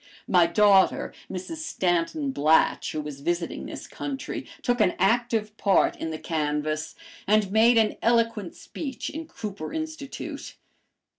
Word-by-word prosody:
My 175 Hz, -2 st, +5 dB
daughter, 195 Hz, +1 st, +4 dB, 0.2 s
Mrs. 190 Hz, -, -5 dB
Stanton 275 Hz, -, 0 dB
Blatch, 155 Hz, -, +3 dB
who 155 Hz, -, -2 dB
was 145 Hz, -2 st, -8 dB
visiting 170 Hz, +2 st, -2 dB
this -, -, -7 dB
country, 275 Hz, -2 st, -5 dB, 0.2 s
took 245 Hz, -1 st, +1 dB
an 180 Hz, -, +3 dB
active 225 Hz, 0 st, +1 dB
part 200 Hz, -2 st, +3 dB
in 165 Hz, -, -4 dB
the 160 Hz, -, -4 dB
canvass, 155 Hz, -1 st, -2 dB, 0.3 s
and 210 Hz, -2 st, +3 dB
made 230 Hz, +3 st, +5 dB
an 220 Hz, -1 st, +3 dB
eloquent 230 Hz, -5 st, +1 dB
speech 270 Hz, -5 st, -6 dB
in 320 Hz, +1 st, -6 dB
Cooper 200 Hz, -, -6 dB
Institute. 315 Hz, -3 st, -6 dB
210 Hz, 135 wpm, -26 LUFS, 170-245 Hz, 0.3 s, My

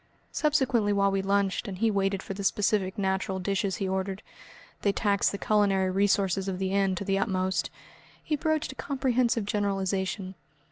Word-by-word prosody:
Subsequently 265 Hz, -8 st, +2 dB
while 200 Hz, -1 st, +3 dB
we 195 Hz, 0 st, 0 dB
lunched 195 Hz, 0 st, 0 dB
and 190 Hz, -2 st, -5 dB
he 225 Hz, +3 st, +2 dB
waited 195 Hz, -1 st, 0 dB
for -, -, -5 dB
the 200 Hz, +1 st, -6 dB
specific 195 Hz, -1 st, +1 dB
natural 190 Hz, -1 st, -1 dB
dishes 195 Hz, +1 st, -1 dB
he 195 Hz, -3 st, -2 dB
ordered 190 Hz, +1 st, -2 dB, 0.6 s
they 200 Hz, -, +2 dB
taxed 200 Hz, 0 st, +1 dB
the 200 Hz, -, -4 dB
culinary 195 Hz, -3 st, +2 dB
resources 195 Hz, -1 st, +1 dB
of 190 Hz, -1 st, -2 dB
the 190 Hz, 0 st, -2 dB
inn 195 Hz, -1 st, +2 dB
to 200 Hz, -, -4 dB
the 195 Hz, 0 st, +1 dB
utmost 185 Hz, -3 st, 0 dB, 0.5 s
he 305 Hz, -, 0 dB
broached 310 Hz, -1 st, -1 dB
a -, -, -12 dB
comprehensive 255 Hz, -6 st, 0 dB
generalisation. 195 Hz, -2 st, -1 dB
195 Hz, 170 wpm, -28 LUFS, 190-210 Hz, 0.6 s, while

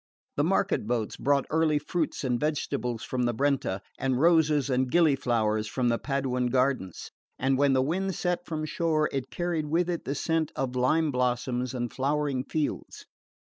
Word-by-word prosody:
The -, -, +1 dB
market -, -, +1 dB
boats 115 Hz, -3 st, -1 dB
brought 140 Hz, 0 st, +1 dB
early 160 Hz, -1 st, +3 dB
fruits 155 Hz, +1 st, -2 dB
and 125 Hz, -2 st, 0 dB
vegetables 140 Hz, -6 st, -2 dB
from 130 Hz, -, -2 dB
the 120 Hz, -1 st, 0 dB
Brenta 135 Hz, -7 st, 0 dB, 0.2 s
and 130 Hz, -2 st, 0 dB
roses 155 Hz, -3 st, +4 dB
and 130 Hz, -1 st, +1 dB
gilly 160 Hz, -1 st, +4 dB
flowers 110 Hz, -5 st, 0 dB
from 125 Hz, +2 st, 0 dB
the 115 Hz, -, +1 dB
Paduan 130 Hz, -3 st, -1 dB
gardens; 125 Hz, -8 st, -1 dB, 0.3 s
and 135 Hz, 0 st, +1 dB
when 140 Hz, 0 st, +3 dB
the 130 Hz, 0 st, +3 dB
wind 185 Hz, +6 st, -1 dB
set 180 Hz, -1 st, -1 dB
from 155 Hz, -1 st, -3 dB
shore 155 Hz, -1 st, 0 dB
it 135 Hz, -2 st, -3 dB
carried 175 Hz, -3 st, -2 dB
with 170 Hz, +3 st, +1 dB
it 170 Hz, -, -4 dB
the 140 Hz, -, -2 dB
scent 160 Hz, +1 st, 0 dB
of 130 Hz, -1 st, -2 dB
lime 150 Hz, +5 st, +2 dB
blossoms 125 Hz, 0 st, -1 dB
and 120 Hz, -1 st, -3 dB
flowering 140 Hz, -1 st, 0 dB
fields. 155 Hz, -2 st, -3 dB
135 Hz, 175 wpm, -27 LUFS, 125-155 Hz, 0.3 s, roses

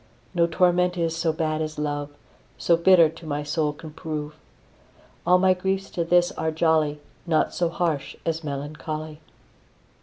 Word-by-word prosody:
No 170 Hz, -2 st, +3 dB
torment 180 Hz, +1 st, +2 dB
is 165 Hz, -1 st, 0 dB
so 165 Hz, -1 st, +1 dB
bad 155 Hz, 0 st, -1 dB
as 155 Hz, 0 st, -4 dB
love, 145 Hz, -1 st, -2 dB, 0.5 s
So 170 Hz, -, +3 dB
bitter 170 Hz, 0 st, +6 dB
to 165 Hz, +2 st, -11 dB
my 145 Hz, 0 st, -2 dB
soul 150 Hz, 0 st, 0 dB
can 155 Hz, +1 st, -10 dB
prove. 150 Hz, -1 st, -5 dB, 0.9 s
All 180 Hz, -, +6 dB
my 185 Hz, 0 st, +4 dB
griefs 190 Hz, +1 st, -2 dB
to 170 Hz, -, -1 dB
this 175 Hz, +1 st, +3 dB
are 160 Hz, 0 st, -2 dB
jolly, 155 Hz, -2 st, +1 dB, 0.3 s
Naught 160 Hz, -2 st, +2 dB
so 175 Hz, -1 st, 0 dB
harsh 165 Hz, -5 st, -2 dB
as 165 Hz, 0 st, -1 dB
melancholy. 155 Hz, +2 st, -5 dB
160 Hz, 155 wpm, -24 LUFS, 150-175 Hz, 0.9 s, bitter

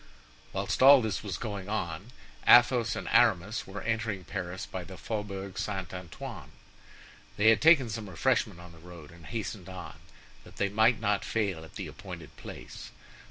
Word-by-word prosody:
Whilst -, -, -2 dB
all 135 Hz, +1 st, +9 dB
this 110 Hz, -5 st, -2 dB
was 100 Hz, -3 st, -4 dB
going 105 Hz, -4 st, -5 dB
on, 95 Hz, -3 st, -3 dB, 0.4 s
Athos 120 Hz, -1 st, +6 dB
and -, -, -5 dB
Aramis 110 Hz, -2 st, +3 dB
were 95 Hz, 0 st, -7 dB
entering 110 Hz, -4 st, -2 dB
Paris 95 Hz, 0 st, -5 dB
by 95 Hz, -3 st, -6 dB
the 95 Hz, +1 st, -10 dB
Faubourg 100 Hz, -3 st, -5 dB
St. 95 Hz, -4 st, -4 dB
Antoine. 90 Hz, -3 st, -8 dB, 0.9 s
They 110 Hz, +2 st, +6 dB
had 110 Hz, -, +4 dB
taken 155 Hz, -5 st, +6 dB
some 110 Hz, -2 st, -5 dB
refreshment 105 Hz, -1 st, 0 dB
on 90 Hz, 0 st, -12 dB
the 85 Hz, -, -15 dB
road 85 Hz, -3 st, -12 dB
and 85 Hz, -1 st, -14 dB
hastened 105 Hz, -5 st, -5 dB
on, 95 Hz, -1 st, -8 dB, 0.5 s
that -, -, -16 dB
they 100 Hz, -, 0 dB
might 110 Hz, +3 st, +3 dB
not 105 Hz, -2 st, 0 dB
fail 100 Hz, -7 st, -1 dB
at 80 Hz, -, -14 dB
the -, -, -5 dB
appointed -, -, -10 dB
place. -, -, -10 dB
100 Hz, 165 wpm, -29 LUFS, 90-110 Hz, 0.9 s, all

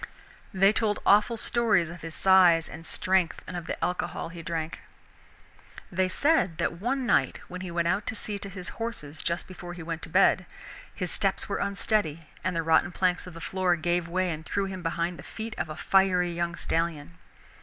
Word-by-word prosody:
They 195 Hz, 0 st, +4 dB
told 215 Hz, -2 st, +1 dB
awful 210 Hz, +3 st, +5 dB
stories 220 Hz, -8 st, +2 dB
of 170 Hz, -2 st, -10 dB
his 165 Hz, 0 st, -6 dB
size 180 Hz, -4 st, +6 dB
and 165 Hz, +1 st, -8 dB
strength 185 Hz, -3 st, +1 dB
and 180 Hz, -, -7 dB
of 175 Hz, -1 st, -5 dB
the -, -, -3 dB
alcohol 180 Hz, -2 st, -3 dB
he 170 Hz, 0 st, -8 dB
drank. 160 Hz, 0 st, -4 dB, 1.1 s
They 185 Hz, +1 st, +1 dB
said 285 Hz, -, +2 dB
that 170 Hz, +1 st, -2 dB
one 260 Hz, +3 st, 0 dB
night, 140 Hz, -, +2 dB
when 180 Hz, +1 st, -7 dB
he 185 Hz, -, -5 dB
went 170 Hz, 0 st, 0 dB
out 205 Hz, +4 st, 0 dB
to -, -, 0 dB
see 205 Hz, -1 st, -3 dB
to 200 Hz, -, -6 dB
his 185 Hz, -2 st, -6 dB
horses 160 Hz, -10 st, -4 dB
just 170 Hz, +1 st, -1 dB
before 175 Hz, -1 st, -8 dB
he 175 Hz, -1 st, -8 dB
went 165 Hz, 0 st, -4 dB
to -, -, -7 dB
bed, 185 Hz, +1 st, +4 dB, 0.4 s
his 180 Hz, -2 st, -3 dB
steps 195 Hz, -1 st, +1 dB
were 200 Hz, -, -2 dB
unsteady 200 Hz, -5 st, 0 dB, 0.2 s
and 185 Hz, 0 st, -1 dB
the 165 Hz, -, 0 dB
rotten 165 Hz, +2 st, +3 dB
planks 180 Hz, 0 st, 0 dB
of 180 Hz, -, -10 dB
the -, -, -8 dB
floor 185 Hz, -1 st, +1 dB
gave 175 Hz, +1 st, 0 dB
way 185 Hz, +1 st, 0 dB
and 155 Hz, 0 st, -5 dB
threw 200 Hz, +5 st, -1 dB
him 190 Hz, -1 st, -5 dB
behind 170 Hz, +1 st, -2 dB
the -, -, -6 dB
feet 220 Hz, 0 st, -7 dB
of -, -, -2 dB
a 155 Hz, -, -5 dB
fiery 185 Hz, -2 st, +3 dB
young 170 Hz, 0 st, -2 dB
stallion. 155 Hz, -, -2 dB
180 Hz, 200 wpm, -27 LUFS, 165-195 Hz, 1.1 s, size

